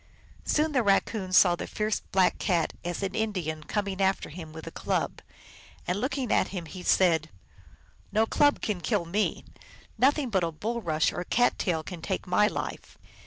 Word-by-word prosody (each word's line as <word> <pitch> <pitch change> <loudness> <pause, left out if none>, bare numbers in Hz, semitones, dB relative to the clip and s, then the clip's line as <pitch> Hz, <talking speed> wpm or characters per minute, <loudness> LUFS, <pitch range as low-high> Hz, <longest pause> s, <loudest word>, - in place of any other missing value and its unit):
Soon 310 +1 +2
the 265 -4 +2
Raccoon 200 -2 +1
saw 180 -1 +6
the - - -6
fierce 215 0 -1
Black 185 -1 +3
Cat, 170 -5 +1
as 175 +3 -3
an 190 -1 -2
Indian, 180 -8 -2
coming 200 +3 -2
after 190 0 +1
him 160 0 -9
with 160 0 -9
a - - -7
club. - - -2 0.6
And, 180 +4 -1
looking 260 -2 -1
at - - +3
him, 180 -4 -5
he 180 +3 -9
said, 175 -3 +3 0.4
" 75 0 -29
No 215 +2 +3
club 290 +5 +2
can 200 -5 -1
kill 200 -2 0
me; 205 +6 -1 0.5
nothing 270 0 +3
but 190 -3 +2
a 165 - 0
bulrush 170 -3 -1
or - - -3
cat 245 +6 +2
tail 165 -5 0
can 175 0 -8
take 190 +3 -3
my 195 +3 +3
life." - - -5
190 Hz, 180 wpm, -28 LUFS, 170-220 Hz, 0.6 s, saw